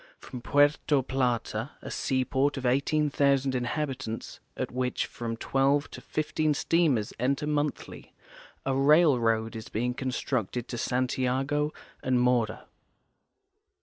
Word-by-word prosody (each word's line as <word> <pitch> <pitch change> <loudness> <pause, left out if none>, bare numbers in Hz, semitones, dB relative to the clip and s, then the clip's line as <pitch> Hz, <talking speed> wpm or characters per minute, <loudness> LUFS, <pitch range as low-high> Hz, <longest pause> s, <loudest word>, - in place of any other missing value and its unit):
From 125 - -9
Puerto 145 +1 +3
Plata, 125 -1 -1
a - - -8
seaport 135 +2 0
of 130 - -4
18,000 140 0 +2
inhabitants, 130 -2 -3 0.2
at - - -3
which 125 0 -1
from 115 -1 -5
12 135 +4 +1
to - - -9
15 155 0 -1
steamers 145 -10 +1
enter 135 +4 0
monthly, 150 -1 -3 0.5
a 135 0 +1
rail 150 0 +5
road 115 0 0
is 110 -1 -7
being 125 +3 -1
constructed 125 -3 -2
to 120 - -4
Santiago 130 +4 0 0.3
and 130 -1 +1
Mora. 120 -3 +1
130 Hz, 115 wpm, -28 LUFS, 125-145 Hz, 0.5 s, rail